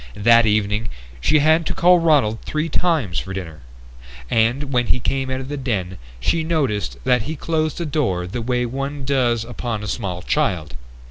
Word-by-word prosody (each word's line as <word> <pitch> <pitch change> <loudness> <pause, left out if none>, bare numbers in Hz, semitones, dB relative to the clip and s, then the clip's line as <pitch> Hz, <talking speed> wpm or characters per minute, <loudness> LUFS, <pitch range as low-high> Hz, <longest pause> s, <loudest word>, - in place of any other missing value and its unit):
That 115 +2 +5
evening 105 +1 0 0.3
she 150 - +3
had 155 +3 +4
to - - -2
call 180 +1 +5
Ronald 145 -10 +2
three 155 +2 -2
times 150 - 0
for 95 0 -6
dinner, 80 -5 -6 0.7
and 125 +5 +1
when 120 -1 +2
he 125 - +2
came 135 +1 -1
out 130 0 -2
of 130 - -7
the 145 +1 -4
den 100 -9 -3 0.2
she 160 - 0
noticed 110 - -1
that 125 -2 +3
he 160 - -3
closed 155 0 -1
the 170 - -3
door 125 - -1
the 105 +7 -4
way 125 +1 0
one 135 +3 -4
does 120 -4 +1
upon 115 -2 -4
a - - -5
small 95 -5 -4
child. 80 -7 0
125 Hz, 185 wpm, -21 LUFS, 105-145 Hz, 0.7 s, That